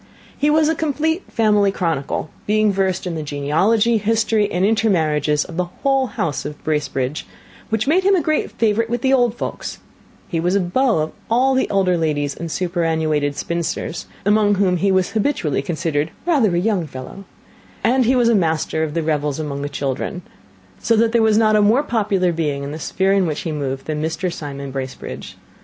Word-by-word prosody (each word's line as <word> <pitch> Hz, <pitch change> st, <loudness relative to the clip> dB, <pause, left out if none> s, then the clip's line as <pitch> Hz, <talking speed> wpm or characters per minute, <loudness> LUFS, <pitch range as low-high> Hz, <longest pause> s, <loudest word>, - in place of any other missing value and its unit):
He 295 Hz, -, +1 dB
was 310 Hz, 0 st, +4 dB
a 320 Hz, -, +2 dB
complete 320 Hz, +3 st, -1 dB
family 210 Hz, -3 st, +3 dB
chronicle, 160 Hz, -5 st, -2 dB, 0.2 s
being 215 Hz, 0 st, +3 dB
versed 190 Hz, -1 st, 0 dB
in 180 Hz, -, -3 dB
the 160 Hz, -, -3 dB
genealogy, 190 Hz, +11 st, +1 dB
history, 220 Hz, 0 st, +1 dB
and 180 Hz, +2 st, +1 dB
intermarriages 155 Hz, -9 st, +1 dB
of 170 Hz, -, -9 dB
the 180 Hz, -, +1 dB
whole 270 Hz, +8 st, 0 dB
house 165 Hz, -, -3 dB
of 150 Hz, 0 st, -6 dB
Bracebridge, 150 Hz, -2 st, -2 dB, 0.4 s
which 220 Hz, -1 st, 0 dB
made 340 Hz, +7 st, +3 dB
him 395 Hz, +1 st, +4 dB
a -, -, +3 dB
great 310 Hz, 0 st, 0 dB
favourite 225 Hz, 0 st, 0 dB
with 240 Hz, 0 st, -2 dB
the 265 Hz, 0 st, +3 dB
old 245 Hz, -3 st, +3 dB
folks; -, -, -5 dB, 0.5 s
he 165 Hz, -, -2 dB
was 175 Hz, +3 st, +1 dB
a -, -, +4 dB
beau 220 Hz, +6 st, +1 dB
of 155 Hz, -, -5 dB, 0.2 s
all 255 Hz, +4 st, +3 dB
the 260 Hz, -, +1 dB
elder 185 Hz, -3 st, +2 dB
ladies 145 Hz, -3 st, 0 dB
and 170 Hz, -, -6 dB
superannuated 160 Hz, -5 st, 0 dB
spinsters, 170 Hz, 0 st, -3 dB, 0.2 s
among 205 Hz, 0 st, +3 dB
whom 185 Hz, -2 st, +2 dB
he 195 Hz, +3 st, +1 dB
was 185 Hz, 0 st, +1 dB
habitually 210 Hz, -, 0 dB
considered 155 Hz, 0 st, -1 dB, 0.2 s
rather 265 Hz, -, +2 dB
a -, -, +2 dB
young 190 Hz, -4 st, 0 dB
fellow, 130 Hz, +8 st, -9 dB, 0.6 s
and 255 Hz, +2 st, +3 dB
he 255 Hz, +3 st, +3 dB
was 245 Hz, -2 st, +3 dB
a 235 Hz, -, +4 dB
master 160 Hz, -4 st, 0 dB
of 155 Hz, -1 st, -2 dB
the 165 Hz, -, 0 dB
revels 150 Hz, -2 st, -1 dB
among 145 Hz, -2 st, -4 dB
the 145 Hz, -, -3 dB
children; 140 Hz, +5 st, -3 dB, 0.6 s
so 230 Hz, -, +2 dB
that 225 Hz, +1 st, +3 dB
there 235 Hz, 0 st, +3 dB
was 220 Hz, -1 st, +4 dB
not 215 Hz, -1 st, +4 dB
a 210 Hz, -, +4 dB
more 225 Hz, +7 st, +4 dB
popular 205 Hz, -8 st, +1 dB
being 150 Hz, -4 st, -2 dB
in 140 Hz, -, -5 dB
the 155 Hz, -, -6 dB
sphere 190 Hz, +4 st, 0 dB
in 195 Hz, -3 st, +2 dB
which 155 Hz, -, -3 dB
he 165 Hz, -, -3 dB
moved 135 Hz, -3 st, -3 dB
than 150 Hz, -1 st, -3 dB
Mr. 165 Hz, +3 st, -2 dB
Simon 140 Hz, -2 st, -6 dB
Bracebridge. 130 Hz, -1 st, -6 dB
185 Hz, 195 wpm, -20 LUFS, 155-225 Hz, 0.6 s, was